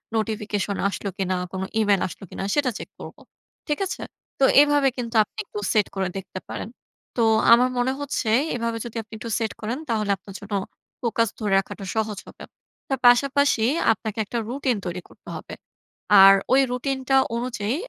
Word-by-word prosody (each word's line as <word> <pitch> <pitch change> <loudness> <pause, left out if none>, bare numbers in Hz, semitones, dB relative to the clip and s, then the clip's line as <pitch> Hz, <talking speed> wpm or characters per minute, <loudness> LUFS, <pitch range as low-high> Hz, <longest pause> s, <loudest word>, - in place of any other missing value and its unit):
Notification 210 -2 -2
আসলো 200 +1 -4
কিনা? 185 -1 0 0.2
কোন 190 0 -4 0.2
ইমেইল 205 -3 +3
আসল - - -11
কিনা? - - -6
সেটা 290 -3 +2
চেক - - -8
করবো। - - -10 0.5
ঠিক 295 +3 -1
আছে? - - -5 0.4
তো 275 - +2 0.2
এভাবে 290 -2 +3
কিন্তু 235 -1 -4
আপনি - - -23
একটু 210 - -6
সেট 215 -2 +3
করে 190 -1 0
দেখতে 190 0 -7
পারেন। - - -5 0.5
তো 230 - +3 0.3
আমার 245 +2 +6
মনে 245 +1 +1
হচ্ছে 280 -5 -2 0.2
এইভাবে 230 -1 -2
যদি 235 - -8
আপনি 220 - -18
একটু 230 +1 -7
সেট 225 -2 -1
করেন 230 +4 -2
তাহলে 215 -3 0
আপনার 195 +1 -13
জন্য 205 0 -8 0.5
ফোকাস 230 -2 +1
ধরে 210 -3 0
রাখাটা 195 +1 -7
সহজ 220 -2 -1
হবে। - - -12 0.4
তার 270 -2 -1
পাশাপাশি 270 -1 +4 0.3
আপনাকে 215 +1 -6
একটা 235 +4 -4
রুটিন 260 -2 0
তৈরি 180 +1 -4
করতে - - -15
হবে। - - -8 0.7
আর 195 - +10 0.2
ওই 270 - +6
রুটিনটা 265 +1 -1 0.2
অনুযায়ী 235 -2 -2
225 Hz, 170 wpm, -24 LUFS, 205-255 Hz, 0.7 s, আর